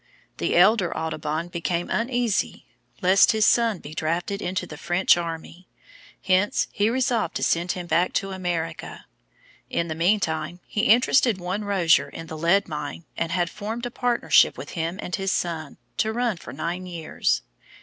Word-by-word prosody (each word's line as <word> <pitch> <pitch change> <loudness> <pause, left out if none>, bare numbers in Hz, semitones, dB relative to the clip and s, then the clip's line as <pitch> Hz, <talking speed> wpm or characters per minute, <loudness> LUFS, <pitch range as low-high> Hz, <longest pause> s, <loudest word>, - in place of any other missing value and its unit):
The - - 0
elder 210 -5 +4
Audubon 160 +1 -3
became 170 0 -2
uneasy 235 -2 0 0.4
lest 190 +5 +6
his 215 -1 +3
son 230 -4 +3
be 150 -2 -10
drafted 170 +6 -2
into 180 0 -2
the 155 - -9
French 175 +4 +3
army; 170 +1 -6 0.6
hence 190 +2 +2
he 205 +2 +1
resolved 240 -2 0
to - - -2
send 170 +1 +1
him 180 -1 -6
back 175 +1 +2
to 195 0 -1
America. 175 -3 -4 0.6
In 170 0 -1
the - - -1
meantime, 165 -2 0
he 210 +2 -1
interested 240 -1 +4
one 185 +3 -3
Rozier 190 -6 +3
in 165 - -8
the 160 - -8
lead 170 +6 +2
mine 150 +1 -6
and 165 0 -2
had 175 0 +1
formed 225 +3 -5
a 245 - -4
partnership 245 -1 +3
between 165 -3 -4
him 170 +4 -5
and 180 - -2
his 195 -1 -1
son, 160 -4 -3 0.2
to 220 - +1
run 235 -3 0
for 140 - -10
nine 175 +7 -4
years. 170 -3 -1
180 Hz, 165 wpm, -24 LUFS, 165-210 Hz, 0.6 s, lest